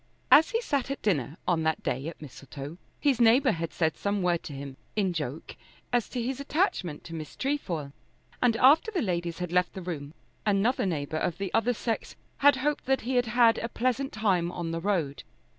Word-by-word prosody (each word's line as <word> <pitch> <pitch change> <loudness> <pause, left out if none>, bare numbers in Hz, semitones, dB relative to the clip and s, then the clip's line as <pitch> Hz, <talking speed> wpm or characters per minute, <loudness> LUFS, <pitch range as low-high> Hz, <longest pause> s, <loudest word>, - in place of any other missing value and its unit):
As 315 - +8
he 460 -1 0
sat 280 - -1
at 275 - -4
dinner 150 - 0
on 170 -2 +2
that 160 0 0
day 135 +4 -2
at 165 - -7
Mistletoe 145 +2 -9 0.2
his 270 -5 +2
neighbour 250 +4 +5
had 165 -1 -3
said 160 -2 0
some 200 -1 -1
word 175 -2 +2
to 145 - -6
him 135 -1 -7 0.2
in 195 -4 +1
joke 150 -2 -5 0.4
as 245 -2 +1
to 250 - -4
his 255 +3 -2
attachment 280 - -1
to 165 - -9
Miss 155 -3 -7
Trefoil, 175 - -2 0.5
and 235 -2 +3
after 295 - +6
the 375 -9 -1
ladies 175 -4 -2
had 180 -2 -4
left 180 0 +2
the 190 - -6
room 155 -3 -6 0.3
another 210 +2 +2
neighbour 155 -3 -2
of 160 +1 -1
the 195 -1 -4
other 245 +2 +2
sex 225 +1 -3 0.2
had 285 0 +6
hoped 290 +2 -1
that 270 0 +2
he 255 +3 -3
had 245 -1 +2
had 230 0 +4
a 230 - -3
pleasant 255 +4 -1
time 190 -6 +1
on 170 -2 -4
the 165 0 -3
road. 170 -8 -1
195 Hz, 205 wpm, -28 LUFS, 160-250 Hz, 0.5 s, As